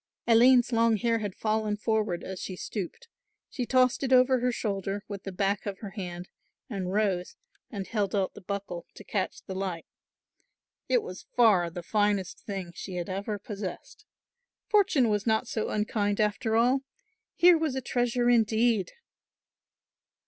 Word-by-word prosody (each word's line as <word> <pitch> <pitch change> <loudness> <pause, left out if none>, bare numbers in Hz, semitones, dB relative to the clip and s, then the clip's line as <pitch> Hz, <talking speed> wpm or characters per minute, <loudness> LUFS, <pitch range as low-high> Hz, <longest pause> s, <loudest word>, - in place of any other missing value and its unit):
Aline's 240 +2 +6
long 230 -1 +3
hair 230 +2 +1
had 205 -3 -4
fallen 215 -1 0
forward 215 -4 -1
as 190 -1 -6
she 185 - -5
stooped; 210 - -6 0.4
she 250 -2 -3
tossed 255 -1 +3
it 265 -2 -1
over 255 0 +5
her 250 +1 +1
shoulder 200 -3 -3
with 200 -2 -6
the 195 - -4
back 195 +2 -1
of 200 -1 -3
her 205 -3 -8
hand 180 -3 -6 0.4
and 195 -7 -4
rose 195 -3 0 0.3
and 200 -2 -5
held 205 -2 -1
out 195 -2 0
the - - -11
buckle 195 -2 -5
to - - -11
catch 195 -3 -3
the 190 - -6
light. 185 -3 -4 1.0
It - - +3
was 185 - -9
far 205 -8 +5
the 175 +1 -7
finest 205 -1 0
thing 190 -4 -6
she 185 +2 -7
had 175 0 -4
ever 200 +3 -3
possessed. 200 -2 -7 0.6
Fortune 380 - +4
was 210 0 0
not 220 +2 +2
so 220 -2 -2
unkind 210 -1 0
after 215 +2 +1
all. 245 +4 +4 0.6
Here 350 0 +7
was 310 -5 -1
a - - 0
treasure 245 -1 0
indeed! 225 -3 +3
210 Hz, 160 wpm, -28 LUFS, 195-235 Hz, 1.0 s, Here